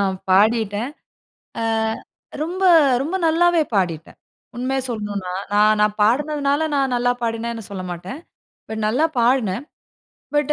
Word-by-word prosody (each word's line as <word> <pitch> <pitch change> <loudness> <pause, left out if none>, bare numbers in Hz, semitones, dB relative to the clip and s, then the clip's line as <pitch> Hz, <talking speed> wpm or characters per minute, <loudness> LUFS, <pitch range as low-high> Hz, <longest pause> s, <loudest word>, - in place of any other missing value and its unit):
நான் 195 -1 +1 0.2
பாடிட்டேன். 215 +3 +2 0.7
ஆ - - -1 0.8
ரொம்ப, 360 +4 -4 0.4
ரொம்ப 325 +6 -4
நல்லாவே 335 +1 +3
பாடிட்டேன். 170 -5 -1 0.4
உண்மைய 265 +2 -1
சொல்லணுனா, 205 -5 -4 0.2
நான், 215 +1 +4
நான் 210 0 +2
பாடினதுனால 290 +5 +1
நான் 270 -2 +1
நல்லா 245 0 +2
பாடினேன்னு 230 0 -3
சொல்ல 190 -2 -5
மாட்டேன். 180 - -7 0.5
பட் 220 0 -4
நல்லா 255 +9 +2
பாடினேன். 235 -2 +1 0.7
பட் 295 0 +2
235 Hz, 120 wpm, -21 LUFS, 205-280 Hz, 0.8 s, நான்